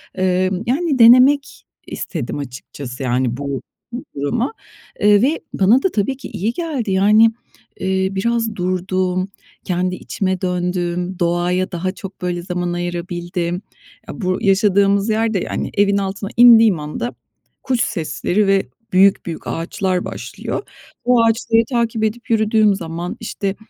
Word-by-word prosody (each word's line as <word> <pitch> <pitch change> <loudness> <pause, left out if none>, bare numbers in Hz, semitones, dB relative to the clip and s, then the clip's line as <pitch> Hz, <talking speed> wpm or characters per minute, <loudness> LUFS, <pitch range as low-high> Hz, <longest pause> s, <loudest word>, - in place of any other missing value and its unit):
Emm, 185 +1 0
yani, 280 +2 0
denemek 255 +5 +5 0.2
istedim - - -5
açıkçası, 135 -1 -7
yani, 125 -1 0
bu 140 -3 -4 0.5
duruma. 185 - -1 0.5
Eee, 205 0 +5
ve 290 +7 +1
bana 215 +7 +4
da 385 - +2
tabii 225 +6 -1
ki 275 - -8
iyi 215 +6 -2
geldi. 285 - -3
Yani, 210 +4 +5 0.5
eee, 190 0 0
biraz 225 +2 -1
durdum, 185 0 -1 0.4
kendi 180 0 -1
içime 190 0 -3
döndüm, 180 0 -2
doğaya 175 +2 0
daha 185 +1 -2
çok, 195 -1 -10
böyle, 175 -1 -2
zaman 175 -1 -2
ayırabildim. 175 0 -3 0.5
Ya, - - -8
bu 185 -1 0
yaşadığımız 200 +1 +3
yer 220 +1 +1
de, 195 - +1
yani, - - -3
evin 200 0 +2
altına 195 +1 -3
indiğim 225 -7 +7
anda, 150 +11 -5 0.5
kuş 255 -3 0
sesleri 180 +5 -1
ve 195 0 +2 0.3
büyük 195 +1 +4
büyük 165 -2 -6
ağaçlar 180 +2 -2
başlıyor. - - -5 0.4
O 245 -1 +4
ağaçları 225 0 +2
takip 235 -3 0
edip 235 +3 -2
yürüdüğüm 215 -2 +3
zaman, 170 0 -5
işte, 200 -3 -3
190 Hz, 135 wpm, -19 LUFS, 180-225 Hz, 0.5 s, indiğim